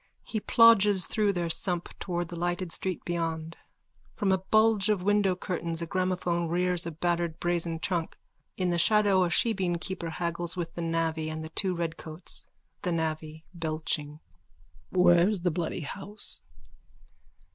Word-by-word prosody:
_(He 215 -2 -3
plodges 210 -5 +5
through 210 -2 +1
their 170 -2 -1
sump 175 +1 0
towards 175 -2 -3
the - - -5
lighted 175 +1 -2
street 185 0 -1
beyond. 165 -1 -3 0.6
From 200 -2 +1
a 190 - +3
bulge 215 +1 +3
of 200 -4 +1
window 205 -2 +3
curtains 170 -2 -3
a - - -2
gramophone 180 -1 -1
rears 180 0 +1
a - - -3
battered 170 0 -1
brazen 170 -1 0
trunk. 170 -1 -2 0.4
In 180 -2 0
the 170 - +1
shadow 200 0 +4
a 175 - +1
shebeenkeeper 180 -3 0
haggles 170 0 -2
with 170 -2 -4
the 170 - -5
navvy 165 -1 -1
and 155 0 -5
the 160 - -7
two 185 +2 -1
redcoats.)_ 165 0 -2 0.3
THE 180 - -1
NAVVY: 155 -1 -3
(Belching.) 155 -2 -2 0.7
Where's 180 +2 +4
the 175 0 +1
bloody 165 +2 -3
house? 195 +7 -6
175 Hz, 145 wpm, -28 LUFS, 165-190 Hz, 0.7 s, plodges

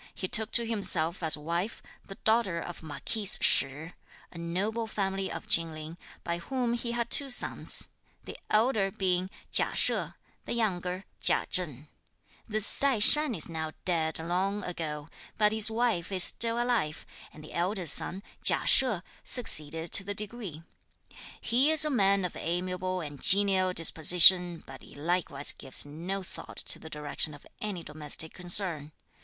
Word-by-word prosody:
He 185 - -3
took 215 +3 0
to 235 - +3
himself 185 -7 0
as 160 -2 +3
wife, 170 +7 -4 0.2
the 195 - -11
daughter 220 -6 0
of 175 0 -8
Marquis 195 +7 -4
Shih, 150 +5 +2 0.4
a - - -12
noble 200 +7 -3
family 195 -2 -3
of - - -7
Chin 165 -1 +2
Ling, 155 +1 -9 0.3
by 170 0 -3
whom 245 +6 -3
he 235 0 -3
had 235 -1 -3
two 280 -1 +3
sons; 245 - 0 0.4
the - - -10
elder 215 -2 +1
being 185 -1 -2 0.2
Chia - - +3
She, - - +5 0.5
the - - -3
younger 185 -4 -2 0.2
Chia - - +4
Cheng. 150 -6 -3 0.6
This 215 -1 -1
Tai 275 -3 +2
Shan 290 +4 +5
is 165 - 0
now 160 -1 -5
dead 160 -3 0
long 185 +5 -3
ago; 155 -4 -6 0.3
but 210 -1 +3
his 220 0 +1
wife 220 -6 -1
is 185 -2 +4
still 230 +4 +2
alive, 240 -11 -2 0.3
and 155 - -14
the 155 - -12
elder 185 +2 -2
son, 180 +5 0 0.2
Chia - - +1
She, 245 -9 +3 0.2
succeeded 160 - +4
to 200 - +3
the 205 +1 -5
degree. 205 -7 -6 0.8
He 255 +6 +1
is 315 -1 +6
a 305 - -1
man 200 -5 +2
of 180 - -6
amiable 180 +2 -3
and 145 -4 -9
genial 190 -1 +3
disposition, 175 +1 +4
but 135 -1 -12
he - - -15
likewise 155 -2 +1
gives 130 - -2
no 175 +7 -6
thought - - -10
to - - -2
the 160 - -11
direction 150 0 -2
of 145 - -17 0.2
any 200 -5 -5
domestic 150 +1 -3
concern. 175 -4 +1
185 Hz, 160 wpm, -28 LUFS, 160-215 Hz, 0.8 s, is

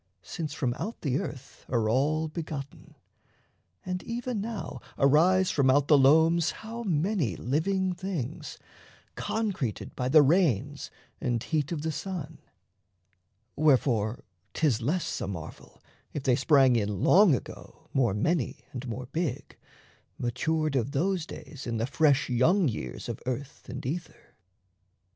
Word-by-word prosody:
since 160 -4 -5
from 130 -5 -1
out 225 - -4
the 140 -2 0
earth 135 -1 -8
Are 115 -3 +1
all 150 +7 +1
begotten. 150 -3 -7 0.9
And 180 0 -3
even 235 -2 -3
now 225 0 -5 0.2
arise 175 +7 +4
From 140 -3 +3
out 140 +2 +3
the 150 - +8
loams 160 +4 +5 0.2
how 230 +2 -5
many 170 - 0
living 185 - 0
things 175 -7 -5 0.6
Concreted 195 - -3
by 125 0 -1
the 155 +1 +7
rains 145 - +1 0.3
and 120 -3 -1
heat 155 0 -1
of 155 -3 -3
the 160 - -1
sun. 160 -1 -5 1.2
Wherefore 125 -7 +2 0.3
'tis 135 -8 +2
less 160 +9 -1
a - - -2
marvel, 85 -5 -9 0.3
if 145 - -4
they 130 -3 +3
sprang 135 -2 +4
In 105 -4 -1
Long 190 -6 +6
Ago - - -9
more 120 -7 +2
many, 150 +5 -1
and 130 0 -6
more 125 +2 -5
big, 140 -1 -3 0.6
Matured 155 +5 -1
of 130 +2 0
those 175 +2 0
days 140 -5 -9
in 115 -1 -2
the 115 - 0
fresh 145 +1 +2
young 160 +9 +3
years 65 - -5
Of - - -4
earth 130 +3 -5
and 130 +1 -6
ether. 165 +6 -6
145 Hz, 140 wpm, -28 LUFS, 125-170 Hz, 1.2 s, the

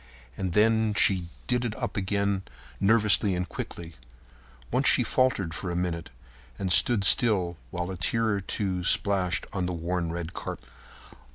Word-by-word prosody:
And 95 -3 -3
then 110 +1 +2
she 95 -4 +2 0.2
did 125 -1 0
it 115 -3 -3
up - - -5
again 100 0 -1 0.4
nervously 105 -1 +3
and 90 +1 -3
quickly. 85 -1 -7 0.8
Once - - +1
she - - +5
faltered 110 -10 0
for 90 +2 -5
a 85 - -3
minute 85 -2 -3 0.5
and 95 -2 -3
stood 115 -1 +4
still 95 -4 +4
while 90 +4 -4
a 95 - -6
tear 115 +7 0
or 100 -2 -1
two 95 -2 -3
splashed 95 -1 +2
on 95 -2 -2
the 90 - -3
worn 85 0 -3
red 85 0 -5
carpet. - - -7
95 Hz, 160 wpm, -26 LUFS, 90-105 Hz, 0.8 s, she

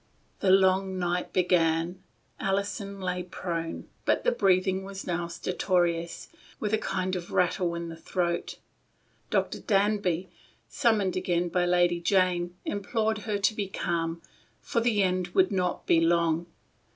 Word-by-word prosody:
The 195 - +1
long 190 0 +4
night 180 0 -1
began. 175 0 +1 0.4
Alison 200 +1 -2
still 195 -1 -7
lay 180 0 -1
prone, 170 -2 -4 0.2
but - - +1
the - - +3
breathing 190 - +2
was 195 0 -7
now 175 -1 -2
stertorous, 170 -1 -1 0.3
with 210 0 -2
a 220 - +3
kind 185 -2 -2
of 175 -1 -5
rattle 175 -1 +1
in 170 0 -4
the 165 - -7
throat. 170 +1 -2 0.7
Dr. - - 0
Danby, 195 -4 +1 0.4
summoned 210 -5 +1
again 175 -1 0
by 175 +1 +1
Lady 175 -1 +3
Jane, 180 -1 +1
implored 215 +2 -1
her 205 - +1
to 200 +2 +2
be 205 -2 -3
calm, 165 -3 -2 0.4
for 235 - -1
the 220 -4 +2
end 180 -1 -1
could 190 +1 +4
not 180 -2 -1
be 165 - +4
long. 170 0 +2
180 Hz, 145 wpm, -28 LUFS, 170-195 Hz, 0.7 s, long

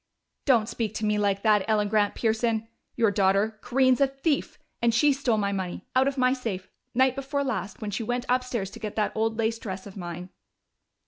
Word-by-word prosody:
"Don't 235 -5 +4
speak 220 -2 -3
to 215 - -2
me 210 0 +1
like 200 -1 +1
that, 210 -3 +4
Ellen 210 -1 +2
Grant 205 -1 +1
Pearson! 225 0 0 0.3
Your 225 -3 +3
daughter 200 +3 +2
Corinne's 255 +1 +3
a 275 - +6
thief 275 +2 -1 0.2
and 235 -1 +3
she 290 +4 +5
stole 260 -5 0
my 200 -1 0
money, 190 -3 -4
out 260 +1 +4
of 275 0 -1
my 255 0 +3
safe. 210 -8 -5 0.2
Night 260 0 +4
before 275 +1 -2
last, 195 -6 -3
when 210 - -3
she 205 - -2
went 245 +2 -2
upstairs 245 -6 -1
to 230 - -10
get 215 -2 -5
that 210 -1 +1
old 225 0 0
lace 225 0 0
dress 190 -3 -6
of 200 - -10
mine." 180 -1 -6
225 Hz, 205 wpm, -26 LUFS, 205-255 Hz, 0.3 s, a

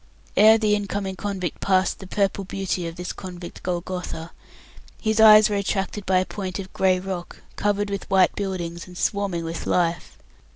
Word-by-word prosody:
Ere 220 +1 +7
the 215 -2 +2
in 205 -1 0
coming 195 -1 -3
convict 190 -5 -4
passed 190 -1 +1
the 190 - -9
purple 195 0 0
beauty 190 -2 -3
of 165 - -7
this 180 +1 -5
convict 180 -2 -9
Golgotha, 180 -2 -4 0.7
his 220 0 0
eyes 215 -1 +9
were 205 - -1
attracted 200 0 -2
by 185 0 +4
a 185 - +2
point 190 -2 -5
of 190 -1 -8
grey 185 -1 +2
rock 185 -2 -6
covered 205 0 0
with 200 - -4
white 190 -2 +4
buildings, 175 -4 -4
and 180 -1 -12
swarming 195 -5 -1
with 165 0 -5
life. 170 -1 0
190 Hz, 175 wpm, -24 LUFS, 180-200 Hz, 0.7 s, eyes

